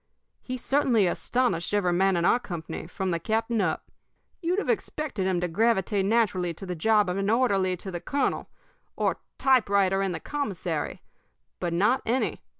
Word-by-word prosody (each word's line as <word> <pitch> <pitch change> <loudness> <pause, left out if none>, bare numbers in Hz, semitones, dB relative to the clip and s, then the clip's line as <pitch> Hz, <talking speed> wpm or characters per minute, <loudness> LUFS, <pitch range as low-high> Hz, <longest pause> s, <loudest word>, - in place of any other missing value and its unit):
He 255 0 -5
certainly 250 -5 +2
astonished 205 -1 0
every 180 -4 +2
man 190 +1 +3
in 170 - +1
our 240 - +4
company, 165 -6 -6
from 185 +1 -3
the 170 - 0
captain 225 +4 0
up. 160 -5 -2 0.5
You'd 350 +2 0
have 415 - -1
expected 270 -11 -2
him 185 -2 +1
to 180 - 0
gravitate 200 +1 +1
naturally 195 -6 +1
to 195 - -7
the 180 - -3
job 210 +4 +3
of 180 +1 -1
an 195 +1 0
orderly 200 -6 +2
to 190 +2 -7
the 175 -1 -5
colonel, 285 0 -1 0.5
or - - 0 0.2
typewriter 200 -7 +3
in 195 -1 0
the 170 - -4
commissary 185 - -3 0.6
but 170 - -2
not 210 +10 +2
any. 250 +4 0
195 Hz, 170 wpm, -27 LUFS, 180-235 Hz, 0.6 s, our